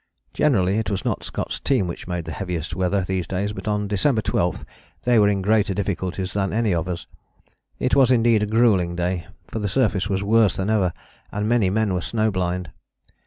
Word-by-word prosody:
Generally 100 -9 +2
it 110 - -2
was 100 -2 -3
not - - -1
Scott's - - -4
team 130 -8 +1
which 85 0 -6
made 90 -2 -3
the 80 - -5
heaviest 85 -3 -4
weather 95 +2 +1
these 90 -2 -2
days 100 +3 -2
but 110 - -8
on 105 -1 0
December 110 +3 +1
12 90 0 -1 0.4
they 120 -2 +4
were 105 -1 +5
in 100 -2 0
greater 105 -1 +2
difficulties 95 -1 -2
than 100 -1 0
any 110 -2 +1
of 85 0 -1
us. 90 -1 -4 0.7
It 130 - -1
was 135 -3 +5
indeed 115 -3 +4
a 105 - 0
gruelling 105 -6 +3
day, 90 0 -2 0.2
for 115 - -5
the 105 - -1
surface 105 -3 +1
was 95 0 0
worse 110 0 +3
than 95 +3 -1
ever 95 -5 +2 0.4
and 105 +1 -2
many 115 -5 +3
men 105 0 +1
were 90 - -1
snow 110 +1 0
blind. 90 -3 -2
100 Hz, 205 wpm, -23 LUFS, 90-110 Hz, 0.7 s, were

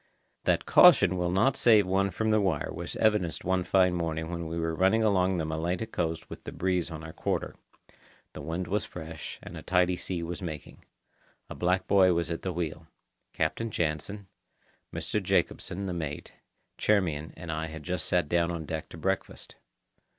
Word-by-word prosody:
That - - +2
caution 90 - +7
will 90 -1 0
not 105 +9 +3
save 110 -4 +5
one 95 +1 +1
from 110 +3 -1
the 110 0 +4
wire 80 -7 0
was - - -6
evidenced 105 -6 +1
one 95 0 +1
fine 90 0 +3
morning 80 -1 -2
when 85 -1 -4
we 80 +1 -4
were 80 0 -1
running 95 +6 +3
along 95 -3 +2
the 80 - -1
Malaita 85 +6 -2
coast 80 -7 -3
with - - -10
the - - -6
breeze 90 -2 0
on 80 -1 -7
our 80 0 -8
quarter. - - -2 0.8
The - - -7
wind 85 +3 -3
was 100 +3 0
fresh, 80 -2 -8
and - - -9
a - - -7
tidy 90 0 +2
sea 90 -1 -4
was 85 +3 -5
making. 80 -5 -7 0.7
A - - -3
black 90 +1 +1
boy 95 -2 +5
was 85 0 -1
at 85 - -3
the 95 - -2
wheel. 80 -2 -4 0.4
Captain 80 +9 -1
Jansen, 85 +3 -2 0.7
Mr. - - -2
Jacobsen 100 +3 0
(the 90 - -2
mate), 80 -4 -5 0.5
Charmian, 85 -8 +1
and 80 0 -6
I 80 +1 -2
had 80 -1 -8
just 90 -1 -2
sat 90 -4 +2
down 85 +1 +2
on 85 -2 -4
deck 80 +1 -5
to - - -10
breakfast. 95 +4 -3
90 Hz, 185 wpm, -29 LUFS, 80-95 Hz, 0.8 s, caution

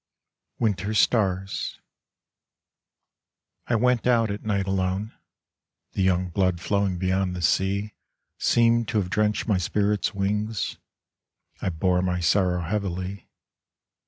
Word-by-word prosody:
Winter 105 -1 0
Stars 95 -4 +1 1.9
I 120 - +1
went 125 +1 +2
out 115 -3 +3
at 100 - -5
night 100 -2 0
alone; 95 +2 -1 0.8
The - - -2
young 90 -1 +2
blood 90 0 +1
flowing 100 0 0
beyond 95 0 0
the 90 - -5
sea 100 +5 +1 0.5
Seemed 115 -1 +3
to 115 - -1
have 90 -3 -1
drenched 105 +2 +1
my 105 -4 +2
spirit's 105 +3 0
wings 105 +1 -2 0.8
I - - 0
bore 90 +2 +1
my 90 -1 0
sorrow 90 +1 +2
heavily. 95 +1 -3
100 Hz, 115 wpm, -25 LUFS, 90-105 Hz, 1.9 s, out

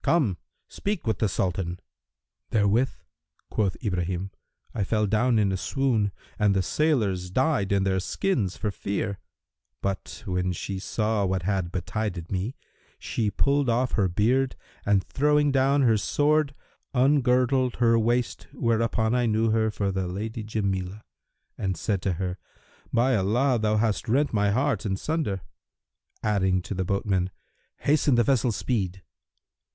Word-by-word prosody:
Come: 125 - +2 0.3
speak 200 -7 -3
with 110 - 0
the 110 - +2
Sultan."[FN#334] 90 -2 -1 0.7
"Therewith" 110 +5 +3 0.6
(quoth 100 -5 0
Ibrahim) 90 -1 -2 0.4
"I 105 - -1
fell 105 +2 +1
down 110 +4 +2
in 100 -2 +2
a 95 - 0
swoon 115 -3 0 0.3
and 105 -2 +3
the 95 - +2
sailors 100 - +1
died[FN#335] 130 - +1
in 100 -1 +3
their 95 -1 +1
skins 100 - -1
for 105 -2 -2
fear; 100 0 -3 0.6
but, 100 +3 -4
when 90 -1 -1
she 95 +2 -4
saw 105 +1 0
what 95 -1 -1
had 95 -2 -1
betided 90 -1 -3
me, 100 +7 -2 0.4
she 110 -3 -1
pulled 140 +4 +1
off 125 +2 +1
her 100 -3 +2
beard 120 +9 +1 0.3
and 100 -2 +3
throwing 150 +1 +2
down 135 +1 +3
her 115 -3 +4
sword, 145 +4 +1 0.4
ungirdled 130 -1 +3
her 115 -1 +3
waist 120 +2 0
whereupon 115 0 +1
I 125 -1 +2
knew 110 +1 +2
her 110 0 +2
for 100 -2 -1
the 95 -1 -2
Lady 110 +5 -4
Jamilah 100 -2 -2 0.6
and 95 -3 -1
said 100 +2 -1
to 95 -1 0
her, 90 +1 -3 0.5
'By 125 +2 +3
Allah, 120 +6 +2
thou 110 0 +1
hast 110 -1 0
rent 140 +4 +2
my 105 -1 +2
heart 135 +8 +1
in 95 -4 -1
sunder!'[FN#336] 140 - -2 0.8
adding 95 -4 +1
to - - -5
the 95 -1 -2
boatmen, 95 -1 0 0.5
'Hasten 145 -2 +3
the 120 - +4
vessel's 125 -4 +2
speed.' 95 -6 -2
105 Hz, 145 wpm, -26 LUFS, 95-125 Hz, 0.8 s, her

